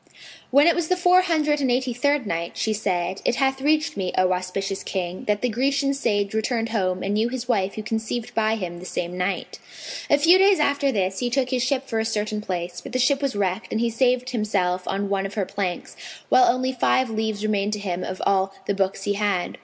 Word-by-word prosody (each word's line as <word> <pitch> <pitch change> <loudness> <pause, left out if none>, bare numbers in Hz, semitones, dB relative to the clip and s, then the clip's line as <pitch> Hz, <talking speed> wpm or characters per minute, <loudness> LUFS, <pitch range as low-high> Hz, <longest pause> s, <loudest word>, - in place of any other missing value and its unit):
When 285 +3 +5
it 340 - +5
was 340 -2 -1
the 365 - +1
Four 360 +1 +5
Hundred 305 -5 +1
and 265 - +1
Eighty 250 0 +1
third 285 +2 +1
Night, 170 -3 -3
She 220 - 0
said, 185 -3 -2
It - - +1
hath 265 0 0
reached 305 +2 +1
me, 190 -3 -2
O 185 0 +3
auspicious 190 +2 -2
King, 180 -1 -4
that 210 +1 0
the - - +3
Grecian 275 +4 +1
sage 205 -7 0
returned 225 +1 -1
home 185 -4 -1
and 200 - -1
knew 220 +3 +1
his 250 -1 -5
wife 200 -5 0
who 215 - -5
conceived 220 +1 -3
by 220 0 +1
him 175 -5 -5
the 180 - -10
same 175 0 -3
night. 180 +2 -3 0.5
A 290 - +5
few 335 +5 +6
days 390 -1 +5
after 280 -1 +2
this 190 -4 -1
he 245 - -1
took 255 0 0
ship 260 +1 0
for 225 -3 -1
a - - +1
certain 215 -1 -2
place, 175 -3 -4
but - - -10
the - - +1
ship 275 +2 +2
was 275 -4 -1
wrecked 195 +1 -2
and 220 - 0
he 235 0 +1
saved 250 +1 +1
himself 185 -6 -1
on 200 +1 -1
one 195 0 -1
of 195 - -11
her 200 -3 0
planks, 190 -3 -4 0.3
while 380 - +6
only 255 +1 -1
five 255 -1 +1
leaves 220 -1 -2
remained 210 -1 0
to - - -1
him 185 -3 -3
of 185 - -5
all 195 0 +1
the 200 - 0
books 195 0 -1
he 205 - 0
had. 200 -3 -1
220 Hz, 230 wpm, -23 LUFS, 195-260 Hz, 0.5 s, few